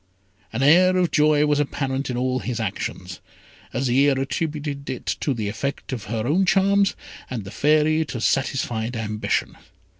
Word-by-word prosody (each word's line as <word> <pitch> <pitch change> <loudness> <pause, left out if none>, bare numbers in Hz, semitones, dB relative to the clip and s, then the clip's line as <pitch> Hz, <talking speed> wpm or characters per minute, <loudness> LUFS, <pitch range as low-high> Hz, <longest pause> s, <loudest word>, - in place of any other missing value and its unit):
An 115 +4 -1
air 185 +5 +5
of 180 -2 +1
joy 150 0 +4
was 150 -1 +2
apparent 135 -1 -2
in 125 - -2
all 130 +1 0
his 120 -1 -4
actions. 100 -4 -4 0.5
Azire 135 +2 +2
attributed 145 0 -3
it 130 - -5
to 145 - -1
the 110 -5 -2
effect 140 +6 -4
of 115 -5 -5
her 110 0 -3
own 165 +9 +2
charms, 195 +1 +3 0.3
and 120 -5 -4
the 95 - -9
Fairy 155 +5 +3
to 125 - -5
satisfied 120 -2 -1
ambition. 105 -1 -2
135 Hz, 155 wpm, -23 LUFS, 115-150 Hz, 0.5 s, air